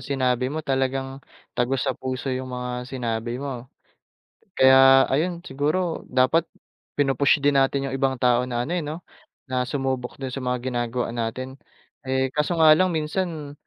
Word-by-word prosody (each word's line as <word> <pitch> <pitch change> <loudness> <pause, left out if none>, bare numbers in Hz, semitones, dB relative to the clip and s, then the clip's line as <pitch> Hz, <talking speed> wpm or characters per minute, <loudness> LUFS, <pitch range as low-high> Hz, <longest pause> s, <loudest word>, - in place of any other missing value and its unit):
sinabi 130 -2 0
mo 155 +2 -5
talagang 135 0 -1 0.3
tagos 130 +3 0
sa 135 - 0
puso 130 +1 -4
'yong 130 0 -4
mga 125 0 -4 0.2
sinabi 120 -2 -3
mo. 130 -2 -6 0.9
Kaya, 135 0 +7
ayun, 170 +5 0
siguro 155 +6 -1
dapat 130 +6 +2 0.5
pinu-push 140 0 +3
din 145 0 +4
natin 135 +1 +1
'yong 135 - -2
ibang 135 -1 +1
tao 125 0 +2
na, 120 -1 -2
ano, 170 - -3
eh, 175 - 0
'no, 155 +3 -6 0.4
na 125 -1 -2
sumubok 130 -3 -3
do'n 130 -2 -5
sa 135 - -4
mga 125 0 -1
ginagawa 120 0 -2
natin. 130 +3 -4 0.5
Eh, 130 0 0
kaso 150 +3 0
nga 155 -1 +7
lang 185 +4 +3
minsan 160 -2 -3
135 Hz, 160 wpm, -24 LUFS, 125-145 Hz, 0.9 s, Kaya